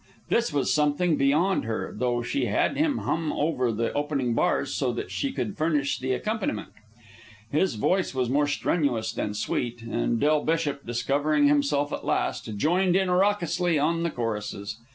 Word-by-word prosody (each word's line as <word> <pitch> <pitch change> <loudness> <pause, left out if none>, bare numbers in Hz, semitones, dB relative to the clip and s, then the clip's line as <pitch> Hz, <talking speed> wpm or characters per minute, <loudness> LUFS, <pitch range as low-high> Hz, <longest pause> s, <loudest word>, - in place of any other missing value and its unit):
This 235 -4 +2
was 145 -2 +1
something 150 +3 +2
beyond 150 +8 +2
her, 110 -4 -3
though 120 +1 0
she 125 +1 -1
had 105 - +1
him 300 -3 +1
hum 160 -2 -1
over 135 -6 0
the 115 +1 -2
opening 145 -4 -1
bars 130 +3 +1
so 130 -3 0
that 120 - -5
she 280 - -1
could 210 -6 -3
furnish 150 -3 +1
the 130 +1 -2
accompaniment. 210 - -2 0.8
His 165 0 +1
voice 180 - 0
was 130 -2 +1
more 145 +4 +2
strenuous 145 -5 0
than 105 - -3
sweet, 120 +2 -2
and 115 0 -1
Del 150 +2 +2
Bishop, 155 -4 -1
discovering 145 +5 +2
himself 145 0 +2
at - - -4
last, 105 - -1
joined 175 - +2
in 190 -1 +2
raucously 180 -3 +2
on 165 +3 +1
the 170 - 0
choruses. 105 -4 -4
145 Hz, 165 wpm, -26 LUFS, 120-165 Hz, 0.8 s, This